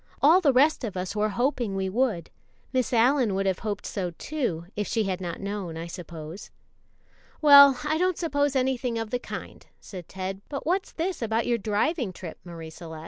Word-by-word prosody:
All 325 +7 +6
the 295 -6 +4
rest 280 +3 +3
of 205 -5 -4
us 185 +3 -4
were 210 0 +1
hoping 240 -3 -1
we 190 0 -1
would. 215 -3 -1 0.4
Miss 255 -1 +1
Allyn 245 -2 +3
would 195 0 0
have 190 -1 0
hoped 210 -2 -4
so, 185 -4 -3
too, 240 - -3
if 210 -2 -2
she 225 - 0
had 190 -2 -2
not 170 -2 -4
known, 195 -5 -4
I 165 - -5
suppose." 170 +1 -8 0.9
"Well, 280 -3 +9
I 310 +1 0
don't 365 -1 +1
suppose 285 -4 0
anything 255 -2 0
of 225 -1 -4
the 245 - 0
kind," - - -8 0.2
said 180 -4 -10
Ted, 190 +1 -5
"but 280 - -5
what's 370 +4 0
this 345 0 -3
about 225 0 0
your 235 -1 +1
driving 220 - 0
trip, 175 -2 -9
Marie 165 -2 -9
Celeste?" 160 -1 -9
220 Hz, 195 wpm, -26 LUFS, 185-275 Hz, 0.9 s, Well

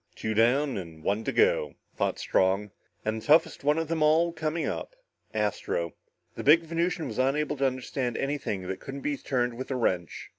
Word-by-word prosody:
"Two 110 - -2
down 125 +5 +3
and 80 -4 -8
one 100 +5 0
to - - 0
go," 475 +2 +2 0.2
thought - - 0
Strong, 95 +2 +1 0.3
and 110 +1 -1
the - - -13
toughest 160 0 +4
one 150 +2 +3
of 165 -1 -1
them 165 0 -1
all 160 +3 +4
coming 160 0 -2
up. - - -4 0.4
Astro. 105 -6 -1 0.4
The - - -6
big 160 +4 +6
Venusian 170 +1 -1
was 115 -1 -5
unable 150 +3 +1
to 135 0 +3
understand 130 -1 -3
anything 135 -9 -2
that 95 0 -4
couldn't 135 +1 -7
be 145 +1 -1
turned 125 -3 -1
with 130 +3 -6
a 135 - -1
wrench. 90 -9 -1
135 Hz, 190 wpm, -28 LUFS, 110-155 Hz, 0.4 s, big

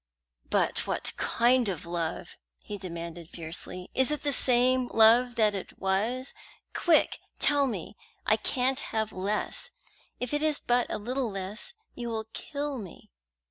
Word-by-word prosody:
"But - - +1
what - - 0
kind 240 -1 +3
of 175 -5 -4
love?" 170 -1 -3 0.3
he 205 -1 -6
demanded 170 -2 -6
fiercely. 175 +2 -3
"Is 265 +1 +4
it 300 -1 -2
the 285 -1 +2
same 255 0 +4
love 235 +2 +5
that 215 -3 +3
it 195 -2 -6
was? 220 +8 0 0.4
Quick, 335 -3 +3 0.2
tell 285 -1 +3
me. 210 -4 -5 0.3
I 215 - +5
can't 255 +4 0
have 220 -6 -2
less. 205 - -2 0.5
If 250 +3 -3
it 295 - +1
is 305 -1 +2
but 245 0 +2
a - - -1
little 245 +3 -2
less, 195 +2 -4 0.2
you 240 -1 -4
will 220 -1 -3
kill 285 -2 -4
me." 190 - -11
230 Hz, 150 wpm, -29 LUFS, 190-255 Hz, 0.5 s, love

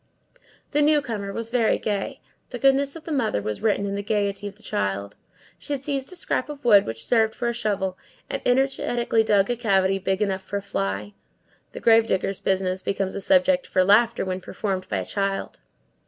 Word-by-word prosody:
The 295 - +2
newcomer 265 -10 +1
was 230 +2 -5
very 235 -3 +2
gay; 210 +5 -3 0.3
the 250 - -5
goodness 275 +2 +2
of 325 - -9
the 325 - -7
mother 225 - 0
is 105 - -3
written 210 -2 +1
in 200 - -3
the 200 - -2
gayety 205 -1 -1
of 200 - -9
the 220 - -19
child; 100 +1 -2 0.4
she 290 - -4
had 275 -1 -4
seized 275 0 -2
a - - -8
scrap 290 -5 -1
of 290 -2 -9
wood 205 -4 +6
which 115 0 -5
served 220 -2 +2
her - - -25
for 240 - -1
a - - -1
shovel, 200 -5 -2 0.3
and - - -3
energetically 245 -3 +1
dug 205 0 +3
a - - 0
cavity 195 -4 +2
big 190 0 -1
enough 195 -2 0
for 200 +1 -4
a - - -4
fly. 100 - -3 0.6
The - - -6
grave 225 0 +5
digger's 190 -1 -1
business 185 -1 0
becomes 195 -1 -2
a 200 - -4
subject 275 +3 +3
for 185 - +2
laughter 225 +4 +4
when 185 0 -3
performed 190 -1 -4
by 100 - -1
a 95 - -3
child. 195 - -3
205 Hz, 205 wpm, -24 LUFS, 190-245 Hz, 0.6 s, wood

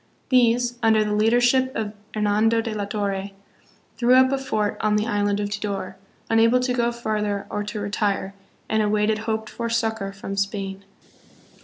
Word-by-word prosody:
These, 245 -1 +3
under 220 -1 +4
the 210 - -1
leadership 245 +4 +3
of 215 -2 -3 0.2
Hernando 215 +2 +2
de 225 -1 -3
la 205 -1 -2
Torre, 200 -1 -2 0.7
threw 245 +1 +4
up 260 0 +5
a 275 - 0
fort 215 -6 -1
on 210 0 +2
the 210 0 +1
island 205 -2 0
of 205 0 -2
Tidor, 200 -2 -4 0.3
unable 230 +2 +4
to 250 0 0
go 240 -1 +1
farther 210 -4 -2
or 210 - -2
to 210 +1 -5
retire, 205 -1 -1 0.3
and 220 0 +1
awaited 210 +1 +1
hoped 220 -1 -2
for 235 -1 -4
succor 225 -3 -1
from 195 0 -6
Spain. 195 -1 -3
215 Hz, 165 wpm, -23 LUFS, 205-235 Hz, 0.7 s, up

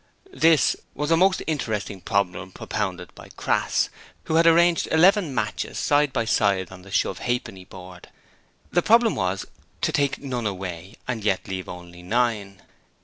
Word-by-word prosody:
'This' 160 - +4 0.2
was 150 +3 -2
a - - +6
most 185 +3 +3
interesting 110 - -3
problem 95 -2 -1
propounded - - -4
by - - -13
Crass, - - +1 0.3
who - - -4
had 165 +1 +5
arranged 170 +1 +4
eleven 180 +1 +4
matches 105 -2 -2
side 145 -1 +2
by 115 - -1
side 100 -4 +1
on 95 -1 -11
the 95 - -14
shove 95 -1 0
ha'penny 120 -7 -3
board. 90 -1 -12 0.6
The 175 - +3
problem 230 +2 +4
was 95 0 -2 0.4
to - - +1
take 140 -1 +1
none 125 -5 -3
away 95 0 -6
and 120 -4 -3
yet 95 -3 0
leave 95 -1 -5
only 90 0 -10
nine. 105 -1 -1
110 Hz, 155 wpm, -24 LUFS, 95-150 Hz, 0.6 s, a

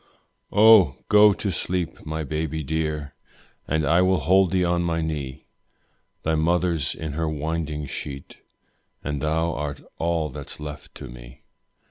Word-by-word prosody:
Oh! 105 -9 +7
go 105 0 +7
to 100 0 -2
sleep, 90 -2 -3
my 80 0 -3
baby 80 +1 -3
dear, 75 -1 -2 0.5
And 80 0 +1
I 85 +4 +4
will 95 -2 +3
hold 95 +5 +4
thee 90 0 +1
on 85 0 +1
my 85 -1 0
knee; 75 -5 -4 0.8
Thy 80 - +1
mother's 80 -2 +1
in 80 -2 -5
her 80 +1 -1
winding 75 0 -3
sheet, 70 0 -7 0.7
And 75 -1 -3
thou 80 +2 0
art 75 -1 -4 0.2
all 85 -2 0
that's 65 - -8
left 75 -1 -8
to - - -8
me. - - -13
80 Hz, 145 wpm, -24 LUFS, 75-85 Hz, 0.8 s, Oh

